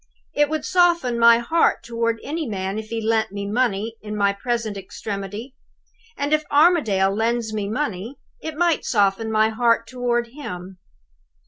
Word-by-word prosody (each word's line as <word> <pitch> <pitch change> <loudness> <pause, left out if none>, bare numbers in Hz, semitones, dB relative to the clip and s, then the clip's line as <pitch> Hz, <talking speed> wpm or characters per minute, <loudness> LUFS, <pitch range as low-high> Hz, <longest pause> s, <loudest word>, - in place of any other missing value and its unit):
It 295 0 +2
would 310 0 -2
soften 345 -10 +2
my 230 0 +7
heart 280 +8 +1
toward 230 -1 -1
any 310 0 -3
man 195 -1 -3
if 220 - -8
he 230 - -2
lent 220 -1 0
me 200 0 -5
money 225 0 -1
in 210 0 -6
my 200 -1 +2
present 230 0 -2
extremity; 200 +4 -6 0.6
and, 285 +2 -1
if 305 0 +3
Armadale 285 - +3
lends 225 +1 -1
me 205 -2 -2
money, 225 -2 -3 0.3
it 315 -1 -6
might 340 -2 +2
soften 205 0 +1
my 220 0 +3
heart 230 0 +2
toward 240 -1 -1
him. 185 -9 -8
230 Hz, 155 wpm, -22 LUFS, 205-255 Hz, 0.6 s, my